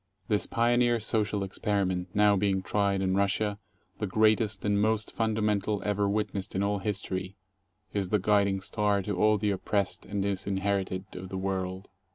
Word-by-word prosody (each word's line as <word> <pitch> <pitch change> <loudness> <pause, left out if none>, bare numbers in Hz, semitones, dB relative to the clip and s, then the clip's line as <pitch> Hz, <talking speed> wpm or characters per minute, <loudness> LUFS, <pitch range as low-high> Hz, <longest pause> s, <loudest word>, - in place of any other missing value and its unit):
This 105 -2 +1
pioneer 120 0 +2
social 105 -2 0
experiment 95 -2 -1
now 105 0 +5
being 95 -1 +1
tried 100 -1 +1
in 95 0 +1
Russia 100 +1 0 0.2
— 95 +1 -41
the 105 - -1
greatest 110 0 +2
and 105 0 +2
most 110 0 +1
fundamental 105 -2 0
ever 100 -1 +1
witnessed 100 -1 -2
in 95 - +1
all 100 0 0
history 95 -2 -3 0.3
— 105 +3 -42
is 100 -3 -1
the 105 - +3
guiding 100 -1 +2
star 100 0 0
to 105 0 -2
all 105 +3 +3
the 105 0 0
oppressed 100 0 -1
and 100 -1 -2
disinherited 95 -1 -1
of 90 +1 -7
the 95 - -4
world. 95 0 -3
100 Hz, 170 wpm, -28 LUFS, 95-105 Hz, 0.3 s, now